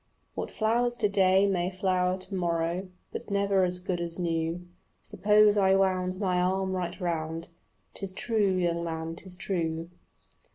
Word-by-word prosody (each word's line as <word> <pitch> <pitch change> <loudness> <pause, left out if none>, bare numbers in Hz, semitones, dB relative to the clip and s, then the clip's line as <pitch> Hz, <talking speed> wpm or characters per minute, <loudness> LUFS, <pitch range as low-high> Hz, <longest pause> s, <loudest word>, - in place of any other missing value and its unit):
What - - -4
flowers 240 +2 +1
to 215 - +1
day 195 -1 +4
may 180 -3 +1
flower 185 -1 0
to 190 +2 -7
morrow, 170 0 -1 0.2
But - - -6
never 200 -1 +2
as 180 0 +1
good 180 -1 -3
as 170 -1 -4
new. 170 0 -2 0.4
Suppose 210 0 +4
I 190 -1 +4
wound 185 -1 +1
my 180 -3 +1
arm 190 +1 0
right 180 -1 -3
round 165 -2 -3 0.2
" - - -43
'Tis 195 -2 -4
true, 205 -1 +1
young 170 -2 0
man, 165 0 -4
'tis 180 +1 -8
true." 165 -3 -2
185 Hz, 160 wpm, -28 LUFS, 170-195 Hz, 0.4 s, day